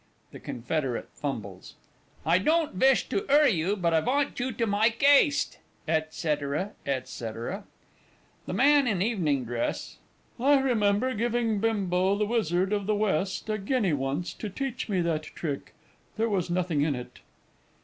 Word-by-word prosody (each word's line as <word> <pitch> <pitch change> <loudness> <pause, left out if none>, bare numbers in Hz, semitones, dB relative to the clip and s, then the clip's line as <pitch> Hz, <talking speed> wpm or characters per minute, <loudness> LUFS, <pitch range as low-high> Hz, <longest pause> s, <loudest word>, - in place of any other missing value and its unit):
(The - - -10
Confederate 130 +1 -3
fumbles.) 100 -10 -6 0.5
I 165 +3 +4
don't 315 - +1
vish 265 +8 +3
to 395 - 0
'urry 290 -2 +6
you 180 +2 0
but 170 -4 0
I 160 - +4
vant 275 - 0
you 250 +1 -1
to 230 +1 -1
mike 220 +4 +1
'aste 285 0 +4 0.3
&c., 160 0 +2 0.4
&c. 140 - -4 0.2
THE 195 +3 -5 0.8
MAN 285 -1 +4
IN 195 -6 0
EVENING 160 - 0
DRESS. 120 0 -3 0.4
I 280 +3 +5
remember 235 -1 +1
giving 230 -1 0
Bimbo, 195 -3 +1
the 210 - +1
Wizard 195 -4 0
of 205 -1 -1
the 215 - +2
West, 195 -2 -1
a 215 0 -1
guinea 205 - 0
once 140 +5 -2
to 215 - -6
teach 260 +3 -4
me 190 -3 +1
that 165 -2 0
trick 155 -2 -6 0.4
there 225 +1 +1
was 185 -4 -1
nothing 175 -4 0
in 145 -1 +1
it. 125 0 -9
200 Hz, 150 wpm, -27 LUFS, 160-235 Hz, 0.8 s, urry